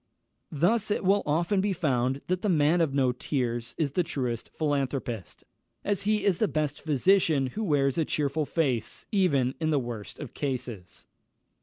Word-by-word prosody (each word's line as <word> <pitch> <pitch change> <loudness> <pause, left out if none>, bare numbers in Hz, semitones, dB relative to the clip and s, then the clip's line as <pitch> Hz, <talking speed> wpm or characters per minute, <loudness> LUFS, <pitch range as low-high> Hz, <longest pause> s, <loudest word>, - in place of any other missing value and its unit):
Thus 195 +9 +1
it 205 - 0
will 200 +2 +4
often 170 +6 +2
be 200 0 0
found 135 -5 0
that 185 0 -1
the 210 - 0
man 160 0 +3
of 160 -4 +2
no 135 -2 +2
tears 120 -2 -2
is 150 -4 0
the 180 - +1
truest 125 -8 -3
philanthropist, 135 - -2 0.4
as 200 -2 0
he 210 -2 +1
is 190 -4 +2
the 215 - +3
best 150 -4 -2
physician 155 -1 +3
who 220 - -3
wears 145 -5 +2
a - - +3
cheerful 150 +1 0
face, 130 -9 -1
even 140 -11 +2
in 160 -1 0
the 150 - +2
worst 120 -5 -5
of 145 -6 -8
cases. 125 - -5
150 Hz, 170 wpm, -28 LUFS, 130-175 Hz, 0.4 s, will